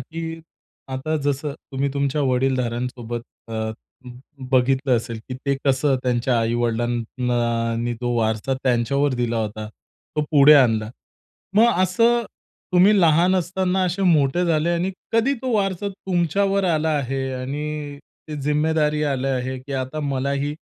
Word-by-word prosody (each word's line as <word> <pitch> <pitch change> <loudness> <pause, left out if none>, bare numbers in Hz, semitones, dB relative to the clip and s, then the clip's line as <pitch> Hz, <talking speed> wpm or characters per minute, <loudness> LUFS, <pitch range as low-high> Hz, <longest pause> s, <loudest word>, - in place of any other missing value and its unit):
की 165 +4 -6 0.5
आता 140 +4 -2
जसं 145 +1 -1 0.2
तुम्ही 135 +1 0
तुमच्या 140 +1 0
वडीलधाऱ्यांसोबत 125 -2 -1 0.3
अ, - - -8 0.5
ब 125 - -9 0.4
बघितलं 130 0 +3
असेल, 115 0 -4
की 130 - -4
ते 140 +2 -1
कसं 135 0 +2
त्यांच्या 125 0 +1
आई-वडिलांना 120 0 -1
नी 120 +1 -1
तो 120 -1 -1
वारसा 110 +3 0
त्यांच्यावर 130 +3 +1
दिला 120 -1 -1
होता, 110 -1 -3
तो 130 +6 -9
पुढे 150 0 +7
आणला. 110 -6 +3 0.7
मग 235 +2 +6
असं 230 +6 +3 0.5
तुम्ही 195 +4 +5
लहान 170 +2 +4
असताना 185 +1 0
असे 180 +2 -1
मोठे 165 -2 +3
झाले 165 -1 +1
आणि 175 +2 0 0.2
कधी 230 +5 +2
तो 255 -1 -1
वारसा 195 -1 0
तुमच्यावर 195 +1 0
आला 160 -3 +1
आहे 135 0 -2
आणि 145 +3 -4 0.3
ते 155 - -5
जिम्मेदारी 150 +1 +1
आले 135 0 -1
आहे, 130 0 -2
की 135 +2 -9
आता 130 +3 -3
मलाही 140 0 -1
140 Hz, 135 wpm, -22 LUFS, 125-165 Hz, 0.7 s, पुढे